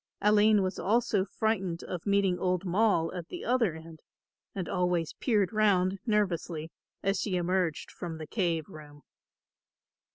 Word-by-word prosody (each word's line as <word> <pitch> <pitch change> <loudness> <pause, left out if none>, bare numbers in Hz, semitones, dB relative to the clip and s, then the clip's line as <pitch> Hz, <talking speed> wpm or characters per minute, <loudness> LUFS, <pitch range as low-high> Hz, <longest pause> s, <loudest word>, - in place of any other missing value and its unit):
Aline 210 0 +4
was 185 0 -3
also 215 -1 +2
frightened 195 -4 -2
of 180 +1 -6
meeting 200 -3 +2
old 185 +1 0
Moll 185 -3 +2
at 175 -2 -6
the - - -7
other 235 -9 +2
end 160 0 -11 0.6
and 185 -4 -3
always 180 -3 0
peered 210 -5 +1
round 195 -3 +2
nervously 175 -6 -1 0.3
as 195 +1 +1
she 195 -4 -1
emerged 180 -2 -1
from 170 -2 -6
the 160 - -7
cave 170 -5 -1
room. 145 -1 -13
185 Hz, 140 wpm, -29 LUFS, 170-205 Hz, 0.6 s, Aline